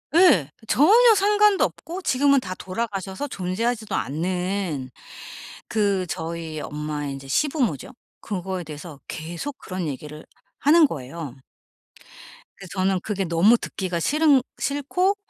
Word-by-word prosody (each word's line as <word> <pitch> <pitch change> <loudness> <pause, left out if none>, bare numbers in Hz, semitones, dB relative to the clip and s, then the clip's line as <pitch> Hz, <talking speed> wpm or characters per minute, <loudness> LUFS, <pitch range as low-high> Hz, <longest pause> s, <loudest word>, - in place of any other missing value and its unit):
예. 215 - +6 0.2
전혀 440 - +6
상관도 415 0 +4
없고 355 +4 -6
지금은 280 -2 +3
다 185 -5 -5
돌아가셔서 195 +4 -4
존재하지도 220 +3 -2
않는 180 -2 -2 0.8
그 200 -4 +1
저희 160 -1 -4
엄마의 150 -1 -4
인제 135 0 -9
시부모죠. 255 - 0 0.3
그거에 190 -2 -4
대해서 150 -1 -9
계속 170 - -6
그런 185 -3 -4
얘기를 150 +2 -7 0.3
하는 310 +1 +6
거예요. 140 - -7 1.2
그래서 195 -2 -11
저는 190 0 +2
그게 200 -3 -2
너무 180 +8 +5
듣기가 180 -6 -3
싫은 295 - +4 0.2
싫고 360 +8 0
190 Hz, 275 characters per minute, -24 LUFS, -, 1.2 s, 예